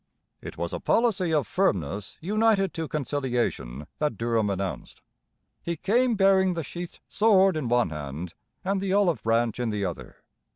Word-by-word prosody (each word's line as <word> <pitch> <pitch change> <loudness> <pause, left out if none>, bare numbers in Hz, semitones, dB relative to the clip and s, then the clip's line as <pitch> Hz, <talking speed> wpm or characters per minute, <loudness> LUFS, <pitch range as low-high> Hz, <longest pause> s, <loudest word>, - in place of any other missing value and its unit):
It - - -8
was - - -3
a - - -2
policy 205 -7 +2
of 150 -5 +2
firmness 100 - -1
united 205 0 +2
to 160 -1 -3
conciliation 125 - -2
that 150 -8 0
Durham 115 -2 +1
announced. 95 -2 -4 0.6
He 170 - -3
came 240 +7 +2
bearing 190 -2 +4
the 165 - -2
sheathed 175 +3 -8
sword 195 -4 +4
in 155 -5 -2
one 120 -7 +2
hand 75 +3 -6 0.3
and 195 0 0
the 195 -1 -1
olive 195 -5 +2
branch 115 +1 +1
in 120 -2 0
the 105 -2 -1
other. 75 -9 -6
150 Hz, 160 wpm, -26 LUFS, -, 0.6 s, bearing